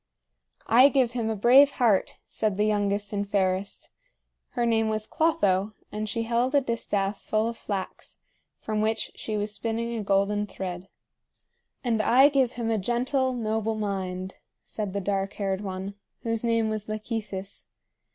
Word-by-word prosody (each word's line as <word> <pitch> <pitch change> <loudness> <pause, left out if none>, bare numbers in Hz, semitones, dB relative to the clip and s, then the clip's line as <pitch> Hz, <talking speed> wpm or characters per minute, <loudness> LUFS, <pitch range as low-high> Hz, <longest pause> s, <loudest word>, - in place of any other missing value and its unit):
"I 255 +5 +7
give 260 -4 +2
him 235 -2 -2
a 220 - -1
brave 260 +7 +6
heart," 225 -8 +2
said 210 -3 -1
the 210 - +2
youngest 205 -1 0
and 200 -1 -2
fairest. 190 0 -1 0.6
Her 240 - 0
name 225 -1 +2
was 215 0 -1
Clotho, 210 - +1 0.2
and 215 0 -3
she 230 +1 -1
held 240 +4 +1
a 285 - +5
distaff 210 -5 -2
full 215 +1 0
of 235 - -3
flax, 200 -4 -6 0.4
from 215 -1 -2
which 220 +1 -1
she 215 -1 -4
was 210 0 -2
spinning 230 +2 -2
a 225 - -2
golden 200 +1 +1
thread. 185 -1 -6 1.0
"And 230 -3 +1
I 260 +6 +6
give 265 -4 +2
him 230 -2 -2
a 220 - +1
gentle, 255 +5 0
noble 220 -2 -1
mind," 190 -3 -3 0.3
said 205 -3 -5
the 200 - -2
dark 195 0 -1
haired 195 -1 -2
one, 190 0 -5 0.3
whose 230 -1 -1
name 230 -1 +2
was 215 0 -4
Lachesis. 215 -3 -5
215 Hz, 160 wpm, -26 LUFS, 200-235 Hz, 1.0 s, I